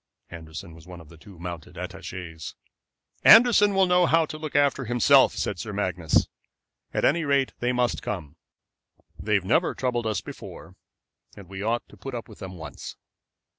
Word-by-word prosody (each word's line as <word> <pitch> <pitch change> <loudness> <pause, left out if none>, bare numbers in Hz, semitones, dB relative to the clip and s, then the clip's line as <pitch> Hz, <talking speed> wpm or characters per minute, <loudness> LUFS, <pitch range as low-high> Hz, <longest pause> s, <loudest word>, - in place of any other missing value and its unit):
Anderson 80 0 -9
was 80 0 -15
one 90 -1 -10
of 80 -3 -15
the 85 - -15
two 95 +1 -15
mounted 85 -2 -8
attachés. 80 -5 -8 0.7
"Anderson 220 -4 +7
will 190 0 +5
know 180 -1 +3
how 165 0 +3
to 155 - -8
look 155 -2 -7
after 140 -2 +2
himself," 120 -1 +4
said - - -3
Sir 110 - -5
Magnus. 90 -5 0 0.6
"At - - 0
any 170 +3 +2
rate 140 -2 +1
they 120 +1 0
must 125 -1 0
come. 75 +1 -5 0.8
They 105 0 0
have 95 -3 0
never 160 - +1
troubled 120 -3 -1
us 110 -3 -1
before, - - -11 0.6
and 100 - -12
we 95 +1 -8
ought 115 +3 -1
to - - -17
put 135 -2 -7
up 115 - -6
with 110 - -15
them 95 -1 -8
once." 80 -3 -9
110 Hz, 175 wpm, -25 LUFS, 85-140 Hz, 0.8 s, Anderson